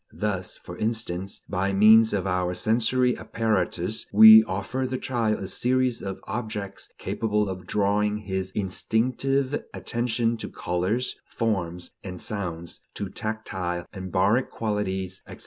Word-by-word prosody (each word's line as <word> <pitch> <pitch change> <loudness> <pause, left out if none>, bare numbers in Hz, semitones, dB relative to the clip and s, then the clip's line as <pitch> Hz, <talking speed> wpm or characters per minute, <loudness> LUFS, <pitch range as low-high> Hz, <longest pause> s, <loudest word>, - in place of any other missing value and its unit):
Thus, 95 -4 -2
for - - -10
instance, 110 -4 -2
by 100 0 -1
means 110 +3 +7
of 95 -2 -1
our 90 -1 0
sensory 125 +4 +2
apparatus 110 -2 -1
we 110 +1 +10
offer 110 +7 -2
the 130 0 -2
child 115 -5 0
a 95 - -5
series 125 +3 +1
of 95 -1 -5
objects 105 -2 -5
capable 105 -2 -1
of 95 -1 -6
drawing 105 +1 +1
his 95 -2 -3
instinctive 130 +7 0
attention 120 -1 -1
to - - -6
colors, 95 +9 -1
forms, 90 -6 -2
and 90 -2 -7
sounds, 85 -5 -3
to 100 - -4
tactile 95 -5 -4
and 95 -2 -7
baric 100 +7 +2
qualities, 95 -4 -3
etc. - - -10
105 Hz, 130 wpm, -25 LUFS, 95-115 Hz, -, we